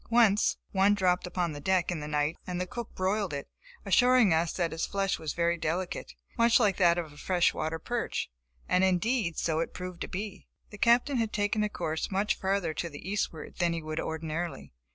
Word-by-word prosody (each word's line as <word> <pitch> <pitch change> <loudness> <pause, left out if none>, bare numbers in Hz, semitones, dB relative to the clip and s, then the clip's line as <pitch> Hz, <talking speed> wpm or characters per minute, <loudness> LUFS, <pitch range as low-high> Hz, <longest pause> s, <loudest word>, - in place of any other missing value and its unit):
Once 225 -3 +4
one 195 +1 +4
dropped 180 -2 +1
upon 175 -1 -1
the 145 - -6
deck 185 +2 +1
in 175 - -2
the 150 - -5
night 150 +1 0
and 180 -1 -3
the 180 - -1
cook 235 +5 -6
broiled 190 -1 0
it, 140 - -5 0.4
assuring 250 -6 +5
us 165 +1 +2
that 170 -3 -1
its 160 - -2
flesh 195 -1 -1
was 155 -2 -3
very 170 0 +1
delicate, 175 +3 -3 0.2
much 230 +1 +5
like 205 -5 +2
that 175 -2 +4
of 160 -4 -4
a - - -16
fresh 175 +2 +2
water 160 +1 -2
perch; 235 - -3 0.4
and 180 +1 +3
indeed, 190 0 +1
so 160 -1 0
it 165 - -3
proved 180 -1 -7
to - - -2
be. 200 +1 -6 0.2
The 210 - -10
Captain 245 +5 +4
had 225 -2 0
taken 205 +1 0
a 210 - 0
course 160 -5 -3
much 200 +2 +1
further 190 -4 0
to 170 - -3
the 145 +3 -10
eastward 195 -5 -3
than 170 -2 +2
he 165 -1 -4
would 155 +1 -3
ordinarily. 160 - -4
180 Hz, 210 wpm, -29 LUFS, 165-205 Hz, 0.4 s, assuring